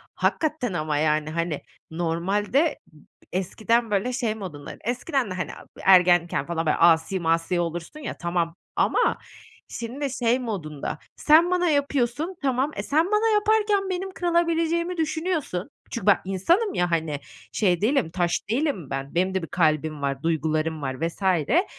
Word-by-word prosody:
Hakikaten 300 - 0
ama, 155 -3 -1
yani, 155 0 +1
hani, 165 -2 -2 0.3
normalde 195 - 0
b - - -18 0.3
eskiden, 220 +5 0
böyle, 205 +6 0
şey 235 -4 -1
modunda, 170 -9 -8
eskiden 250 - -1
de, - - -2
hani, 185 - -3 0.3
ergenken 175 -5 +4
falan, 165 -1 -2
böyle, 150 - +2
asi 165 +2 +4
masi 165 +1 +1
olursun, 170 - -4
ya, 260 - -6
tamam, 170 -1 -1 0.2
ama - - +2 0.5
şimdi 260 +5 -4
şey 240 +2 +2
modunda, 170 - -4 0.2
sen 330 +4 +5
bana 355 -1 +2
yapıyorsun, 285 +3 0
tamam. 270 +2 +1
E, - - -3
sen 315 +4 +2
bana 435 +2 +3
yaparken 420 -2 +2
benim 375 +1 -3
kırılabileceğimi 340 0 0
düşünüyorsun. 315 - -2 0.2
Çünkü 230 - -4
ben 205 - +7
insanım 335 - +1
ya, 175 -1 0
hani, 160 -3 -1 0.3
şey 180 -4 +1
değilim, 245 - +2
taş 175 -1 0 0.2
değilim 240 - -1
ben. 135 +3 -5
Benim 185 +2 +1
de 190 - 0
bir - - -4
kalbim 155 -3 +1
var, 140 0 -2
duygularım 160 -1 0
var 130 -1 -3
vs. 170 - -10
E, 190 - +3
195 Hz, 150 wpm, -25 LUFS, -, 0.5 s, ben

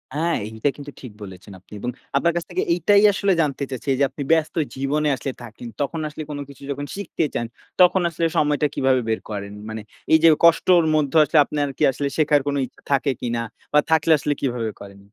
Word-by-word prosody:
আ - - -2 0.3
এইটা 110 +5 -1
কিন্তু 145 0 -9
ঠিক 125 - -9
বলেছেন 95 0 -11
আপনি। 95 - -18
এবং 120 - -3 0.3
আপনার 170 +4 +2
কাছ 175 - -1
থেকে 180 0 -1
এইটাই 200 +4 +4
আসলে 195 0 +1
জানতে 145 -2 -1
চাচ্ছি। 130 +1 -7
এই - - -2
যে - - +4
আপনি 145 - -6
ব্যস্ত 160 -1 +2 0.2
জীবনে 140 +3 0
আসলে 135 +1 -4
থাকেন, 120 +1 -10
তখন 145 +3 -2
আসলে 150 +1 -7
কোনো 145 -1 -5
কিছু 140 0 -14
যখন 145 +1 -4
শিখতে 195 -5 -2
চান 120 - -2 0.4
তখন 180 +1 +5
আসলে 165 0 -2
সময়টা 150 -1 +2
কিভাবে 130 -1 +2
বের 110 - 0
করেন? 100 -1 -5 0.2
মানে 110 0 -5 0.3
এইযে 160 +1 +6 0.2
কষ্টর 170 +1 +5
মধ্যে 150 0 +1
আসলে 155 - 0
আপনার 145 0 -2
কি - - 0
আসলে 140 +2 -3
শেখার 150 -2 +3
কোনো 145 0 0
ইচ্ছা 125 - -18
থাকে 140 0 +2
কিনা 120 -1 -2 0.3
বা 150 - +6
থাকলে 160 0 +3
আসলে 145 +1 0
কিভাবে 120 -4 -2
করেন? 100 0 -11
145 Hz, 205 wpm, -22 LUFS, 125-160 Hz, 0.4 s, এইযে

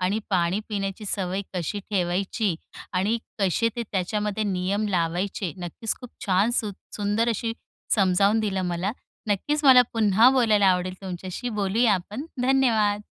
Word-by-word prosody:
आणि 185 +4 +1
पाणी 185 +1 +1
पिण्याची 200 0 -3
सवय 190 -1 -1
कशी 185 +3 -2
ठेवायची 190 +1 0 0.4
आणि 195 +5 +1 0.2
कसे 200 +4 +2
ते 240 - -1
त्याच्यामध्ये 210 +3 -1
नियम 200 +2 -1
लावायचे, 180 0 -1
नक्कीच 180 +5 -3
खूप 250 - -10 0.2
छान, 195 +3 +3
सुं 230 -3 0 0.3
सुंदर 210 +3 +1
अशी 225 0 -1 0.4
समजावून 200 +2 +3
दिलं 195 -3 -1
मला. 175 +4 -1 0.4
नक्कीच 295 +9 0
मला 260 -2 +9
पुन्हा 220 +1 +5
बोलायला 220 -6 +3
आवडेल 185 0 +1
तुमच्याशी. 185 +5 -5
बोलूया 210 +2 +2
आपण. 210 - -5 0.2
धन्यवाद. 230 -6 +3
205 Hz, 135 wpm, -25 LUFS, 185-220 Hz, 0.4 s, मला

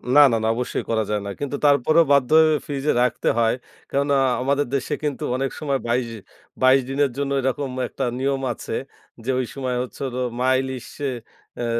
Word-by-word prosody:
না, 145 - +9
না, 115 - +2
না, - - +1
অবশ্যই 125 0 -2
করা 110 -1 +1
যায় 105 -1 0
না। 100 - -4
কিন্তু 145 0 -3
তারপরেও 150 +4 +5
বাধ্য 135 -3 +3
হয়ে 155 -1 +5
ফ্রিজে 145 +1 -1
রাখতে 125 -2 0
হয়। 115 0 +3 0.4
কেননা? 140 0 +2 0.2
আমাদের 140 +2 +1
দেশে 135 - -2
কিন্তু 145 -3 -2
অনেক 135 +1 -1
সময় 140 -3 -1
২২, 120 0 +1 0.6
২২ 130 +1 +6
দিনের 140 -1 +1
জন্য 140 -1 -1
এরকম 135 +1 -1 0.2
একটা - - -3
নিয়ম 135 0 0
আছে - - -6 0.5
যে, - - -3
ঐ - - +1 0.2
সময় 130 -2 -2
হচ্ছে 130 - -10
হল 125 0 -5 0.2
মা 130 +1 +2
ইলিশে 130 +2 -5 0.5
আ - - -1
135 Hz, 185 wpm, -23 LUFS, 125-140 Hz, 0.6 s, না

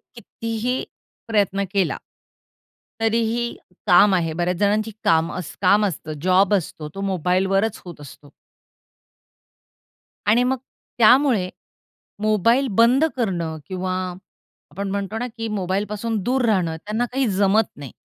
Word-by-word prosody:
कितीही 230 +2 -3 0.4
प्रयत्न 200 -3 +1
केला 195 -3 0 1.0
तरीही 230 +1 0 0.3
काम 190 +2 +6
आहे 165 -3 0
बऱ्याच 175 +1 -1
जणांची 210 +2 +1
काम 165 +1 +3 0.3
काम 205 +3 +4
असतं, 155 -4 -4
जॉब 185 +2 +3
असतो 155 -4 -4
तो 195 - -5
मोबाईलवरच 195 +2 0
होत 170 -4 -10
असतो. 145 0 -13 2.0
आणि 230 +4 +4
मग 260 0 0 0.4
त्यामुळे 235 -4 +5 0.7
मोबाईल 220 +5 +3
बंद 245 +6 +5
करणं 170 -9 -2
किंवा 185 0 -3 0.8
आपण 200 0 -4
म्हणतो 200 +2 -3
ना 245 - -2
की 225 0 -3
मोबाईलपासून 205 +4 -2
दूर 255 0 +1
राहणं 180 -7 +1
त्यांना 220 +3 0
काही 270 0 +1
जमत 200 +2 +3
नाही. 140 -4 -9
200 Hz, 115 wpm, -22 LUFS, 185-225 Hz, 2.0 s, काम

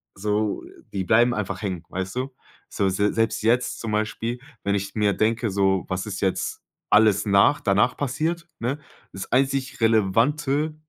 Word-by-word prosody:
so 105 +1 -1 0.3
die 95 - -1
bleiben 120 +4 +4
einfach 100 -3 -3
hängen, 95 -5 -3
weißt 95 +2 -4
du? 130 +1 -3 0.4
So, 100 - 0
se 100 +2 +1
selbst 115 0 0
jetzt 120 +3 +1
zum 115 - -4
Beispiel, 110 +3 -2 0.2
wenn 100 0 +1
ich 100 0 -4
mir 105 -2 +2
denke, 115 +1 +1
so, 95 -1 +1
was 90 +2 -2
ist 100 -2 -5
jetzt 95 -1 -1 0.3
alles 105 -1 +4
nach 100 +8 +4
danach 100 +4 +2
passiert, 160 +5 -2
ne? 130 +5 -2 0.3
Das 95 - -7
einzig 135 0 +1
Relevante 135 +8 +2
110 Hz, 160 wpm, -24 LUFS, 100-125 Hz, 0.4 s, bleiben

